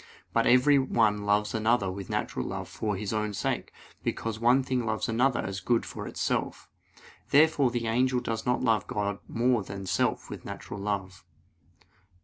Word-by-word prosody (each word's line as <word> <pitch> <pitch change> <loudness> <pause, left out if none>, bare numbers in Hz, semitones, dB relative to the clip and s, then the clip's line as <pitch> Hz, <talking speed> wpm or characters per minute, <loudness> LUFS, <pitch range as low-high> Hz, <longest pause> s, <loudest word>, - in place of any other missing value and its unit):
But - - +3
every 135 +3 +6
one 105 -6 +1
loves 105 +1 +2
another 110 -3 +2
with 95 0 -7
natural - - -2
love - - -5
for 105 -2 -3
his 100 +2 -3
own 105 -1 -1
sake: - - -2 0.3
because 110 -1 -3
one 125 +3 +4
thing 130 -1 -1
loves 110 -1 -1
another 120 +3 +2
as 95 0 -4
good 120 +3 +1
for - - -7
itself. - - -2 0.6
Therefore 145 -2 +5
the 120 -1 -2
angel 125 +3 +2
does 115 -2 -3
not 125 +1 0
love 110 -1 +2
God 100 -1 -2
more 120 0 +2
than 100 0 -7
self - - 0
with - - -8
natural 100 - -7
love. 95 -2 -3
110 Hz, 165 wpm, -28 LUFS, 105-125 Hz, 0.6 s, every